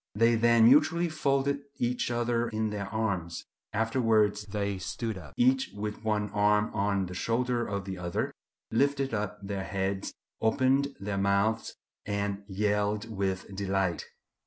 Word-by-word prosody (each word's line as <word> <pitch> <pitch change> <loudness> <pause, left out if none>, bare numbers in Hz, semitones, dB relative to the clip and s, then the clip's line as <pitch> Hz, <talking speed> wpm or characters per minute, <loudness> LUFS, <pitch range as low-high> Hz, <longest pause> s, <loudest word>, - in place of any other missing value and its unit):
They 115 +2 +4
then 115 0 +5
mutually 155 +7 +5
folded 140 -2 +1 0.2
each 120 0 0
other 120 0 0
in 110 -1 -1
their 100 -2 -3
arms. 100 -6 -2 0.3
Afterwards 110 -2 +2
they 100 -1 -2
stood 110 +3 -3
up, 75 -7 -11
each 130 +2 +3
with 105 +1 -5
one 105 -2 0
arm 105 +1 +2
on 100 -1 +1
the 90 - -7
shoulder 120 +4 0
of 100 -2 -3
the 95 -2 -5
other, 90 -1 -2 0.4
lifted 135 +1 +1
up 105 -1 -2
their 100 -1 -3
heads, 95 0 -2 0.3
opened 130 +5 +2
their 100 0 -2
mouths, 100 +3 +1 0.3
and 100 -1 -2
yelled 105 +2 -1
with 95 0 -2
delight. 95 -3 -1
105 Hz, 140 wpm, -29 LUFS, 100-120 Hz, 0.4 s, then